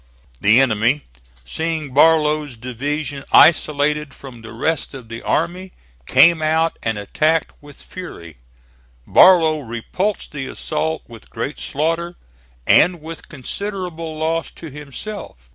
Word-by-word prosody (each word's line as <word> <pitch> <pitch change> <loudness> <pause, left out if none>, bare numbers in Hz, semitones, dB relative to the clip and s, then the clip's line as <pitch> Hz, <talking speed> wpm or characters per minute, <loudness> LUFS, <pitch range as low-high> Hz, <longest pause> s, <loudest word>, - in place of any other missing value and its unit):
The 110 +5 +5
enemy 120 +2 +2 0.4
seeing 160 - -3
Barlow's 150 -2 +3
division 135 +4 -4
isolated 150 -2 +4
from 130 -4 -12
the 115 - -10
rest 145 +5 -2
of 125 -4 -11
the 115 0 -7
army, 180 +3 -2 0.3
came 160 +5 +5
out 160 +1 +1
and 110 -2 -2
attacked 155 +10 0
with 145 -1 -15
fury. 85 - -10 0.7
Barlow 165 -4 +6
repulsed 140 - -3
the 135 -3 -5
assault 160 0 -3
with 115 -2 -14
great 130 +6 -5
slaughter, 165 +4 -2 0.5
and 175 0 +4
with 160 +1 -10
considerable 165 - -5
loss 160 +1 -1
to 160 -3 -11
himself. 145 - -9
150 Hz, 120 wpm, -19 LUFS, 130-165 Hz, 0.7 s, Barlow